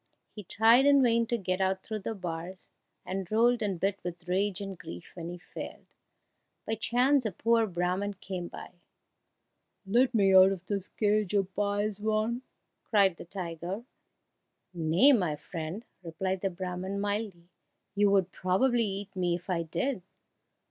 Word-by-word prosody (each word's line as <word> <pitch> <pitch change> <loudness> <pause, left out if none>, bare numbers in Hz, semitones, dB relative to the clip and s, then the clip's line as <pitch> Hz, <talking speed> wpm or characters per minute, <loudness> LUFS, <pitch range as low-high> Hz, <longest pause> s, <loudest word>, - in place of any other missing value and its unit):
He 210 - -9
tried 230 +8 +5
in 280 -1 +6
vain 230 -1 +3
to 235 - 0
get 185 -2 -2
out 190 0 0
through 220 -1 -4
the 220 +3 -4
bars, 180 0 -6 0.4
and 190 0 -4
rolled 235 +2 +3
and 195 -5 -1
bit 195 +2 0
with 175 0 -7
rage 190 +2 0
and 195 -1 -5
grief 85 - -10
when 170 -1 -6
he 175 - -6
failed. 180 - -9 0.8
By 220 - -2
chance 250 +5 +2
a 215 - -1
poor 230 +4 +2
Brahman 185 +3 -1
came 185 -2 -5
by. - - -10 1.1
"Let 240 +5 +2
me 195 -3 +4
out 190 0 +8
of 185 -1 -9
this 200 -1 -3
cage, 210 -2 0
oh 200 - +4
pious 205 +2 -2
one!" 215 +3 0 0.4
cried 195 -5 +3
the - - -9
tiger. 175 +3 -5 0.9
"Nay, 170 - +5
my 180 - +2
friend," 165 +7 -6 0.2
replied 185 +2 -3
the 195 - 0
Brahman 185 +2 -4
mildly, 200 -4 -3 0.4
"you 205 0 +3
would 190 -2 +2
probably 230 +7 +2
eat 195 0 -4
me 180 -2 +1
if 180 +2 -6
I 170 -2 +1
did." 220 - -2
195 Hz, 160 wpm, -29 LUFS, 180-215 Hz, 1.1 s, out